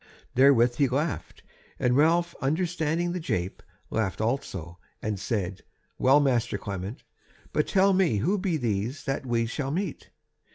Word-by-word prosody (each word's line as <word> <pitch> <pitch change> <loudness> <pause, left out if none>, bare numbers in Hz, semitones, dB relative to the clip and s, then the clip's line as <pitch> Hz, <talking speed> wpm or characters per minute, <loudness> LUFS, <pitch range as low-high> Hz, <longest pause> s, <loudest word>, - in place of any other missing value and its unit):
Therewith 125 -2 +5
he 140 -2 +4
laughed, 145 +5 -3 0.3
and 125 0 +2
Ralph 170 +4 +3
understanding 165 +2 0
the 180 - -2
jape, 90 - -2 0.3
laughed 110 -5 -1
also; 100 - -3 0.2
and 105 -3 -3
said: 95 -3 -2 0.4
"Well, 135 +3 +6
master 125 -4 +1
Clement, 100 +3 -6 0.5
but 150 - +1
tell 195 0 +4
me 185 - +3
who 185 - +1
be 185 -4 0
these 115 +1 -2
that 135 0 -3
we 115 -1 +1
shall 135 +4 -3
meet." 175 +2 -3
135 Hz, 140 wpm, -27 LUFS, 110-165 Hz, 0.5 s, Well